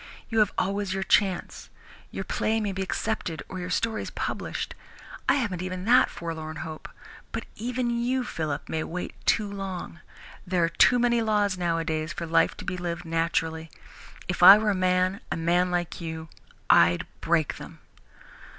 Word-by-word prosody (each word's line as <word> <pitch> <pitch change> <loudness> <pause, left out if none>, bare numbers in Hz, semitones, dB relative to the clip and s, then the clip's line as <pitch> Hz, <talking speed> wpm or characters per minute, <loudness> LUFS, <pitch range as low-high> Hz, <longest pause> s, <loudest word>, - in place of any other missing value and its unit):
You 225 -1 +1
have 210 - +4
always 195 0 -1
your 195 - -1
chance. 190 -1 +1 0.4
Your - - -5
play 220 +1 0
may 210 -2 -1
be 190 0 -4
accepted 190 -3 -2
or 185 - -6
your 180 0 -5
stories 220 +4 -1
published. - - -4 0.6
I - - +5
haven't 205 -10 -1
even 185 0 -4
had - - -2
that - - +5
forlorn 160 -2 -6
hope. 155 -1 -8 0.4
But - - -4
even 245 +1 -2
you, 245 +2 0
Philip, 155 -9 -4
may 160 0 -2
wait 180 +2 -5
too 215 - +3
long. 195 -4 -6 0.5
There 180 -2 +1
are 165 - +2
too 245 - +5
many 240 -1 +2
laws, 210 -3 +1
nowadays, 165 -2 -1
for 170 - -5
life 165 0 +2
to - - -8
be 180 - -3
lived 175 -1 -4
naturally. 165 -1 -1 0.6
If - - -3
I 200 - +11
were 215 -1 +1
a - - +1
man, 185 +2 +1
a - - -1
man 175 +2 +2
like 175 0 -2
you, 160 -1 -6 0.4
I'd 85 0 +5 0.2
break 165 -3 +1
them." - - -10
180 Hz, 170 wpm, -26 LUFS, 165-210 Hz, 0.6 s, I